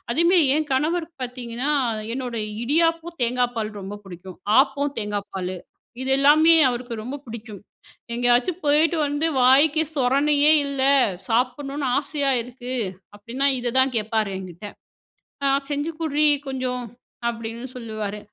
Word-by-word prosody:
அதேமேரி 340 +4 +4
என் 310 0 -1
கணவருக்கு 320 +4 -1
பாத்திங்கன்னா 250 +2 -4 0.4
என்னோட 250 -2 -4 0.3
இடியாப்பம் 330 +5 +1
தேங்காய் 245 +1 +1
பால் 215 -1 -2
ரொம்ப 195 +2 -7
பிடிக்கும், 185 0 -11 0.2
ஆப்பம் 285 0 0
தேங்காய் 205 -1 -3
பாலு, 185 -1 -4 0.5
இது 265 - -2
எல்லாமே 305 +4 +6
அவருக்கு 245 -1 -4
ரொம்ப 255 +5 -5
பிடிக்கும். 220 -3 -9 0.5
எங்கேயாச்சும் 245 +8 +2
போயிட்டு 310 +4 +3
வந்து 290 +2 0 0.2
வாய்க்கு 285 +5 +5
சொரணையே 285 +3 +3
இல்லை 275 0 +2 0.4
சாப்புடன்னும் 275 +4 -1
ஆசையா 285 -1 -1
இருக்கு 250 +1 -8 0.4
அப்படின்னா 235 +7 -2
இத 240 -1 -2
தான் 260 0 +3
கேட்பாரு 215 -1 0
என்கிட்ட. 185 +1 -9 0.8
ஹ - - +1 0.2
"செஞ்சுகுற்றி 305 0 -1 0.2
கொஞ்சம்" 255 -2 -3 0.5
அப்படின்னு 230 +1 -6
சொல்லுவாரு. 215 -3 -5
255 Hz, 120 wpm, -23 LUFS, 230-290 Hz, 0.8 s, எல்லாமே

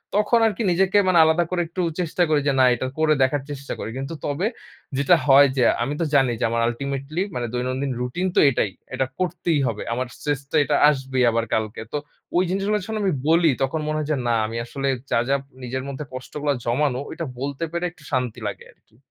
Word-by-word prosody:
তখন 210 +3 +3
আরকি 220 +2 -2
নিজেকে 190 +3 +3
মানে 180 -2 +5
আলাদা 160 +2 +3
করে 180 -1 0
একটু 175 +3 -4 0.2
চেষ্টা 175 0 +1
করি 155 -2 +3
যে, 140 - +3
না 130 - +7
এটা 130 +2 -3
করে 155 -1 +4
দেখার 135 +2 +1
চেষ্টা 140 -1 -5
করি। - - -4
কিন্তু 135 +4 -4
তবে 145 +6 -1 0.5
যেটা 140 +6 +5
হয় 140 +1 +8
যে, 125 - +4 0.2
আমি 135 +4 -2
তো - - +2
জানি 135 -3 +4
যে - - -2
আমার 115 0 0
ultimately 140 +6 -3
মানে 120 -1 -1
দৈনন্দিন 130 +2 -1
রুটিন 125 +10 -1
তো - - +5
এটাই। 110 -6 0 0.2
এটা 130 +1 0
করতেই 175 -3 0
হবে। 110 -3 -3
আমার 125 +1 -2
stress 145 -2 -2
তো - - -2
এটা - - +1
আসবেই 135 -2 -2
আবার 115 0 0
কালকে। 110 0 -1
তো - - +1 0.4
ওই 180 - +4
জিনিসগুলার 195 +2 0
সামনে 220 0 -3
আমি 190 -3 +2 0.2
বলি। 165 0 +5
তখন 135 +4 -1
মনে 155 0 -1
হয় 155 -1 -2
যে - - +2
না 120 - +2
আমি 115 +2 -4
আসলে 135 +3 -4 0.2
যা, - - +3
যা, 140 - +4 0.3
নিজের 130 +1 -3
মধ্যে 140 +2 -5
কষ্টগুলা 145 +3 -2
জমানো 125 +2 +1
ঐটা 165 - -5
বলতে 140 +3 -3
পেরে 170 +1 -2
একটু 160 - -21
শান্তি 125 -4 -1
লাগে - - -6
আরকি। - - -33
140 Hz, 215 wpm, -23 LUFS, 130-170 Hz, 0.5 s, হয়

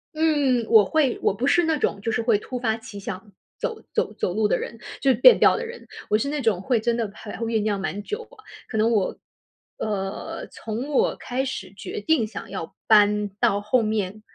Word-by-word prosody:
嗯， 290 -7 +2
我 220 -2 +8
会。 285 0 +1
我 - - +2
不 240 +7 -2
是 350 +5 +4
那 320 -2 +1
种 200 - -1
就 225 - -1
是 225 - 0
会 225 -2 +3
突 250 +4 -6
发 225 -3 0
奇 220 -2 -10
想 195 +1 -7 0.3
走 450 - -4
走 - - 0
走 180 - -2
路 215 +1 +2
的 - - +2
人， 230 - -6 0.2
就 275 - +3
是 - - +2
变 460 - +7
调 - - +6
的 475 - -3
人。 470 +1 -10 0.2
我 210 - +4
是 260 - -2
那 295 0 -2
种 220 -7 +1
会 245 +3 +1
真 235 +1 0
的 225 -3 -1
还 210 0 -8
会 230 - -3
酝 225 -1 +1
酿 205 -1 0
蛮 195 +1 -4
久， 425 - -4
啊， 425 - -17 0.2
可 220 - -4
能 220 +2 +3
我， 205 -5 0 0.6
呃， 195 -2 -4
从 225 +6 -5
我 290 - +2
开 260 +2 -3
始 195 -8 -5
决 - - -6
定 240 -2 +2
想 215 - -8
要 185 -4 -6
搬 210 -1 +5
到 200 +1 +2
后 220 +4 +2
面， 215 -1 -2
225 Hz, 240 characters per minute, -24 LUFS, 205-260 Hz, 0.6 s, 我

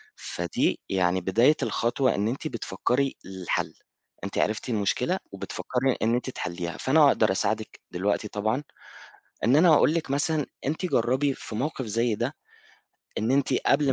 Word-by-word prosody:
فدي 85 -1 -1
يعني 95 -1 +1
بداية 115 - +4
الخطوة 125 +3 +1
إن 100 +2 0
أنتِ 130 +7 -3
بتفكّري 125 +2 -1
للحل، 95 -2 -3 0.5
أنتِ 100 - -5
عرفتِ 110 +4 0
المشكلة 105 -4 0
وبتفكّري 130 0 -1
إن 115 +2 +2
أنتِ 125 +1 -2
تحلّيها 85 -6 -4
فأنا 150 +2 +5
أقدر 110 -7 +3
أساعدِك 110 +3 -2
دلوقتي 100 +4 0
طبعًا، 110 +7 -1 0.8
إن 125 +5 +4
أنا 165 +1 +6
أقول 150 - +5
لِك 160 -5 -2
مثلًا 145 +1 +1 0.2
أنتِ 155 +6 -1
جرّبي 130 -1 +1
في 110 - -8
موقف 135 +1 -2
زي 115 +1 0
ده - - -2 0.9
إن 110 +3 0
أنتِ 135 0 +2
قبل 140 -1 +4
120 Hz, 145 wpm, -26 LUFS, 100-140 Hz, 0.9 s, أنا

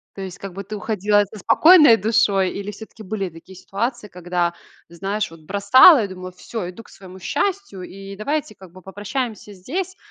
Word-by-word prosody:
То 195 - -7
есть 185 -2 -7
как 195 -2 -8
бы 195 +2 -7
ты 210 +2 -7
уходила 205 -1 +1
со 205 +1 -12
спокойной 305 - +6
душой? 205 -3 +2
Или 200 +1 -6
всё-таки 220 +1 -12
были 200 -1 -3
такие 170 +3 -15
ситуации, 225 +4 -4
когда, 175 -2 -2 0.3
знаешь, 195 +5 -3
вот 165 -1 -15
бросала 205 - +6
и - - -5
думала, 185 -1 -9
всё, 180 +1 -6
иду 185 +5 -11
к - - -20
своему 190 -1 -13
счастью, 390 - -3
и 195 +2 -10
давайте 250 +2 -3
как 190 -3 -15
бы 185 +2 -15
попрощаемся 210 +4 -5
здесь, 345 - -5
200 Hz, 185 wpm, -21 LUFS, 185-225 Hz, 0.3 s, спокойной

